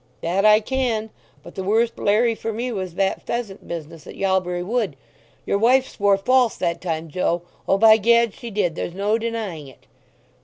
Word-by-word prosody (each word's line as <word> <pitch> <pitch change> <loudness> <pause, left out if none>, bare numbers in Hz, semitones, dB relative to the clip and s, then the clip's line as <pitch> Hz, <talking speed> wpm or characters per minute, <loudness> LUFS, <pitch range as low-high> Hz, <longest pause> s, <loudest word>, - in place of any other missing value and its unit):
"That 185 +5 0
I 215 0 +6
can. 225 -3 -2 0.3
But - - -12
the 190 - -5
worst 225 +4 +1
larry 230 +3 +2
for 225 0 -4
me 240 +3 -3
was 185 -5 -5
that 195 0 0
pheasant 230 -5 -5
business 165 -1 -8
at - - -9
Yalbury 185 -2 0
Wood. 210 - -1 0.5
Your 200 - 0
wife 255 +4 +4
swore 200 -1 +2
false 250 +3 +2
that 170 0 -2
time, 165 -2 -3
Joe—O, 175 +3 -2
by 220 +1 +7
Gad, 235 +1 +3
she 235 - -9
did—there's 175 -4 -2
no 205 +3 0
denying 220 -10 -4
it." 135 - -17
205 Hz, 170 wpm, -22 LUFS, 180-230 Hz, 0.5 s, by